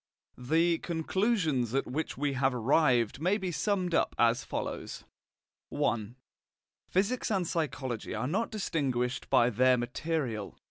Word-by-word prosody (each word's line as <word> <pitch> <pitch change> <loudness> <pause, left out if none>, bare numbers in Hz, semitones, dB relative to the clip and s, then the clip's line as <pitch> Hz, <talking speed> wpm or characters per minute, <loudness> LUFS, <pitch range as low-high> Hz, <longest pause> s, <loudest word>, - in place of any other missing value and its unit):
The 165 +6 +2
conclusions 165 - 0
at 135 - +1
which 155 +5 -3
we 145 0 0
have 135 -1 +1
arrived 125 -1 +2
may 185 +5 +2
be 185 -4 -3
summed 180 +2 0
up - - +1
as 120 +1 +3
follows: - - -5 0.7
I. 110 +1 -1 0.7
Physics 205 +7 0
and 195 -4 +1
psychology 135 -8 -3
are - - -2
not 200 +10 0
distinguished 135 - -2
by 120 +1 +4
their 125 +3 +4
material. 120 -3 -3
145 Hz, 130 wpm, -30 LUFS, 125-175 Hz, 0.7 s, by